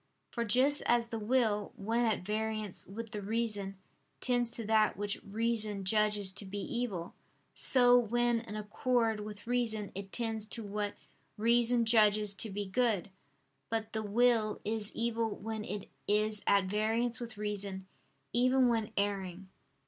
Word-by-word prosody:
For 235 Hz, -, -2 dB
just 260 Hz, +6 st, +4 dB
as 240 Hz, -1 st, +3 dB
the 230 Hz, -1 st, -5 dB
will, 215 Hz, -2 st, 0 dB
when 230 Hz, +4 st, 0 dB
at 215 Hz, -4 st, -1 dB
variance 215 Hz, -1 st, -3 dB
with 220 Hz, +3 st, -7 dB
the 210 Hz, -3 st, -5 dB
reason, 205 Hz, -2 st, -1 dB, 0.4 s
tends 245 Hz, -2 st, +1 dB
to 230 Hz, -1 st, -6 dB
that 215 Hz, 0 st, +2 dB
which 205 Hz, 0 st, -3 dB
reason 215 Hz, -2 st, 0 dB
judges 210 Hz, -1 st, +2 dB
to 200 Hz, +2 st, -1 dB
be 200 Hz, +2 st, -6 dB
evil; 200 Hz, -5 st, -3 dB, 0.4 s
so, 245 Hz, -1 st, +6 dB
when 240 Hz, 0 st, +1 dB
in 225 Hz, -2 st, -8 dB
accord 225 Hz, +1 st, 0 dB
with 210 Hz, 0 st, -8 dB
reason, 230 Hz, -4 st, -1 dB
it 195 Hz, 0 st, -7 dB
tends 225 Hz, -2 st, -2 dB
to 230 Hz, +1 st, -5 dB
what 205 Hz, 0 st, -3 dB, 0.4 s
reason 235 Hz, +2 st, +3 dB
judges 215 Hz, -2 st, +4 dB
to 220 Hz, +2 st, +1 dB
be 205 Hz, +1 st, -4 dB
good. 205 Hz, -2 st, 0 dB, 0.6 s
But 225 Hz, -1 st, -2 dB
the 220 Hz, -, -1 dB
will 220 Hz, 0 st, +2 dB
is 215 Hz, -1 st, -2 dB
evil 230 Hz, -1 st, -1 dB
when 220 Hz, 0 st, -5 dB
it 205 Hz, 0 st, -6 dB, 0.2 s
is 210 Hz, 0 st, +2 dB
at 200 Hz, -1 st, +4 dB
variance 225 Hz, +5 st, 0 dB
with 235 Hz, -3 st, -7 dB
reason, 200 Hz, -2 st, -4 dB, 0.5 s
even 255 Hz, +1 st, +4 dB
when 225 Hz, -2 st, -1 dB
erring. 195 Hz, -2 st, -2 dB
215 Hz, 150 wpm, -32 LUFS, 205-235 Hz, 0.6 s, so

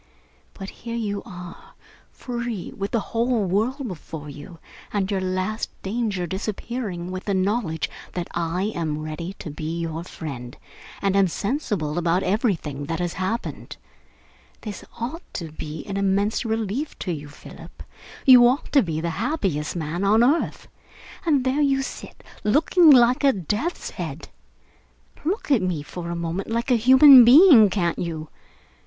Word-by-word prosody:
But 195 Hz, -1 st, -7 dB
here 230 Hz, 0 st, -5 dB
you 205 Hz, -3 st, -2 dB
are, 180 Hz, -3 st, -11 dB, 0.3 s
free, 235 Hz, -5 st, -5 dB
with 200 Hz, 0 st, -3 dB
the 235 Hz, -, 0 dB
whole 235 Hz, -2 st, +1 dB
world 235 Hz, +9 st, -1 dB
before 155 Hz, -5 st, -8 dB
you, 145 Hz, +4 st, -11 dB, 0.3 s
and 200 Hz, -1 st, -1 dB
your 195 Hz, -2 st, 0 dB
last 185 Hz, +4 st, -2 dB
danger 205 Hz, -3 st, -2 dB
disappearing 195 Hz, 0 st, -4 dB
with 185 Hz, 0 st, -6 dB
the 200 Hz, -, 0 dB
knowledge 190 Hz, -4 st, 0 dB, 0.3 s
that 175 Hz, -1 st, -3 dB
I 175 Hz, +4 st, -1 dB
am 155 Hz, -3 st, -2 dB
ready 165 Hz, +4 st, -5 dB
to 155 Hz, -, -7 dB
be 155 Hz, +3 st, -4 dB
your 165 Hz, 0 st, -4 dB
friend 130 Hz, -8 st, -8 dB, 0.5 s
and 195 Hz, -1 st, +1 dB
am 195 Hz, -1 st, +4 dB
sensible 195 Hz, -, -2 dB
about 175 Hz, +2 st, +1 dB
everything 180 Hz, -, -1 dB
that 165 Hz, +3 st, -3 dB
has 175 Hz, -1 st, -2 dB
happened. 225 Hz, +6 st, -4 dB, 0.8 s
This 210 Hz, -3 st, -7 dB, 0.2 s
ought 260 Hz, +9 st, -4 dB
to 165 Hz, -3 st, -5 dB
be 155 Hz, 0 st, -7 dB
an 195 Hz, -1 st, -4 dB
immense 200 Hz, +3 st, +1 dB
relief 225 Hz, +6 st, -2 dB
to 185 Hz, -, -4 dB
you, 145 Hz, -3 st, -6 dB
Philip. 145 Hz, -, -13 dB, 0.4 s
You 250 Hz, -2 st, +9 dB
ought 255 Hz, +4 st, -1 dB
to 280 Hz, -, +5 dB
be 160 Hz, -6 st, -3 dB
the 170 Hz, 0 st, -2 dB
happiest 185 Hz, -, -1 dB
man 165 Hz, +2 st, -3 dB
on 215 Hz, +4 st, +4 dB
earth. 290 Hz, +7 st, +1 dB, 0.6 s
And 285 Hz, -5 st, +3 dB
there 265 Hz, +3 st, +1 dB
you 270 Hz, -2 st, +2 dB
sit, -, -, -9 dB, 0.2 s
looking 315 Hz, -, +4 dB
like 250 Hz, 0 st, +6 dB
a 275 Hz, -, +6 dB
death's 210 Hz, -, -3 dB
head! -, -, -6 dB, 0.9 s
Look 355 Hz, 0 st, -2 dB
at 255 Hz, -7 st, +4 dB
me 180 Hz, -5 st, -2 dB
for 170 Hz, +3 st, -7 dB
a 170 Hz, -, -3 dB
moment 170 Hz, +3 st, -4 dB
like 235 Hz, +3 st, -1 dB
a -, -, +6 dB
human 260 Hz, +3 st, +9 dB
being, 250 Hz, -, +8 dB
can't 175 Hz, -4 st, -1 dB
you? 160 Hz, -3 st, -4 dB
195 Hz, 155 wpm, -23 LUFS, 170-240 Hz, 0.9 s, You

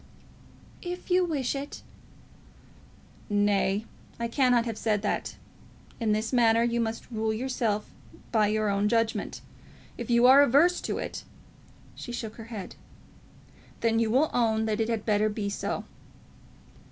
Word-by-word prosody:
"If 360 Hz, +1 st, -6 dB
you 365 Hz, +1 st, +4 dB
wish 290 Hz, -8 st, -1 dB
it." 280 Hz, +1 st, -6 dB, 1.5 s
"Nay; 205 Hz, 0 st, +1 dB, 0.3 s
I 235 Hz, -, -1 dB
cannot 245 Hz, -1 st, +3 dB
have 225 Hz, -2 st, -5 dB
that 210 Hz, -2 st, 0 dB, 0.2 s
said. -, -, -7 dB, 0.7 s
In 225 Hz, -3 st, +1 dB
this 215 Hz, +3 st, -1 dB
matter 230 Hz, -2 st, +4 dB
you 235 Hz, 0 st, +1 dB
must 225 Hz, +2 st, -4 dB
rule 220 Hz, -1 st, -1 dB
yourself 225 Hz, -3 st, -2 dB, 0.4 s
by 215 Hz, -2 st, +3 dB
your 215 Hz, 0 st, 0 dB
own 200 Hz, +1 st, +1 dB
judgment. 230 Hz, -1 st, -1 dB, 0.6 s
If -, -, -5 dB
you 235 Hz, 0 st, +4 dB
are 265 Hz, +3 st, +8 dB
averse 290 Hz, +7 st, +4 dB
to -, -, -3 dB
it -, -, -5 dB, 0.4 s
" -, -, -26 dB, 0.3 s
She 240 Hz, -, -8 dB
shook 225 Hz, -2 st, -6 dB
her 225 Hz, -, -9 dB
head. 220 Hz, -5 st, -7 dB, 1.1 s
"Then 225 Hz, -1 st, +2 dB
you 230 Hz, -1 st, +1 dB
will 270 Hz, +7 st, +2 dB
own 220 Hz, -2 st, +2 dB
that 215 Hz, 0 st, -1 dB
it 220 Hz, -, 0 dB
had 225 Hz, -2 st, -2 dB
better 215 Hz, 0 st, +2 dB
be 210 Hz, -1 st, -3 dB
so." -, -, -3 dB
230 Hz, 150 wpm, -27 LUFS, 215-245 Hz, 1.5 s, are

